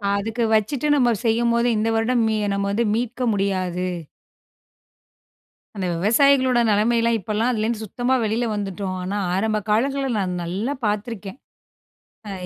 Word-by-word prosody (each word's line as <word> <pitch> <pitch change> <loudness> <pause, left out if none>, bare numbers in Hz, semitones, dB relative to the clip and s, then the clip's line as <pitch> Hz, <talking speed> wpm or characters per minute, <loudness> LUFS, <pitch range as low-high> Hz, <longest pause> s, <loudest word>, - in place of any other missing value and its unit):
அதுக்கு 225 +3 -2
வச்சுட்டு 240 +7 +1
நம்ப 245 -4 +3
செய்யும்போது, 235 +1 +2
இந்த 220 +2 0
வருடம் 230 +1 +1
மீ 220 -1 0 0.2
நம்ம 200 0 -1
வந்து 230 +3 +1
மீட்க 245 +1 -2
முடியாது. 185 -2 -1 1.9
அந்த 190 -2 -3
விவசாயிகளோட 255 - +3
நெலைமையலாம், 230 +2 +2
இப்பல்லாம் 215 +5 -1
அதுலேருந்து 220 -1 -2
சுத்தமா 245 +5 -1
வெளியில 225 +3 0
வந்துட்டோம். 195 -2 -4
ஆனா, 200 +3 -3 0.2
ஆரம்ப 215 +3 0
காலங்கள்ல 270 +6 +1
நான் 185 -2 -1
நல்லா 200 +11 -2
பார்த்துருக்கேன். 210 0 -3 0.9
அ - - -5
220 Hz, 125 wpm, -22 LUFS, 200-240 Hz, 1.9 s, நம்ப